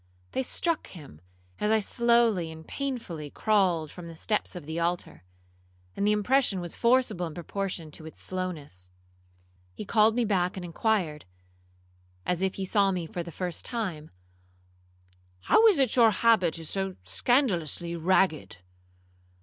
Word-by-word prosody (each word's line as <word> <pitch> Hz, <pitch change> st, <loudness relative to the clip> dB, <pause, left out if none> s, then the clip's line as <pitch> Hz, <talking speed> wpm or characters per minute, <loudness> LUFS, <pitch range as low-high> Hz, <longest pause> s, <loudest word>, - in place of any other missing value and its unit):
They -, -, -1 dB
struck 330 Hz, +5 st, -1 dB
him 145 Hz, -, -12 dB, 0.4 s
as 210 Hz, -, 0 dB
I 220 Hz, 0 st, +4 dB
slowly 230 Hz, -6 st, +2 dB
and 160 Hz, 0 st, -11 dB
painfully 230 Hz, -, -4 dB
crawled 180 Hz, -6 st, +1 dB
from 175 Hz, -2 st, -9 dB
the 165 Hz, -, -9 dB
steps 210 Hz, +4 st, -2 dB
of 175 Hz, -5 st, -7 dB
the 160 Hz, +2 st, -4 dB
altar, 170 Hz, -, -2 dB, 0.7 s
and 200 Hz, -, 0 dB
the -, -, +4 dB
impression 210 Hz, 0 st, +2 dB
was 175 Hz, -1 st, -5 dB
forcible 235 Hz, -7 st, +2 dB
in 155 Hz, -, -9 dB
proportion 175 Hz, -2 st, -4 dB
to 155 Hz, +1 st, -9 dB
its 160 Hz, -, -11 dB
slowness. 155 Hz, -, -5 dB, 0.9 s
He -, -, -6 dB
called 220 Hz, +1 st, +4 dB
me 240 Hz, -1 st, +2 dB
back 185 Hz, -3 st, 0 dB
and 180 Hz, -, -5 dB
inquired, 175 Hz, -4 st, -1 dB, 1.0 s
as 180 Hz, 0 st, 0 dB
if 190 Hz, -1 st, 0 dB
he 195 Hz, -, -3 dB
saw 200 Hz, 0 st, +3 dB
me 180 Hz, -3 st, -2 dB
for 175 Hz, +2 st, -5 dB
the 170 Hz, 0 st, -7 dB
first 180 Hz, 0 st, -3 dB
time, 185 Hz, -11 st, -4 dB, 1.3 s
'How 450 Hz, -, +5 dB
is 410 Hz, -7 st, +5 dB
it 265 Hz, -5 st, +2 dB
your 235 Hz, -3 st, +7 dB
habit 215 Hz, -7 st, +3 dB
is 165 Hz, -2 st, -6 dB
so 190 Hz, -1 st, -2 dB
scandalously 170 Hz, -, 0 dB
ragged?' 170 Hz, -, +1 dB
185 Hz, 150 wpm, -28 LUFS, 165-220 Hz, 1.3 s, your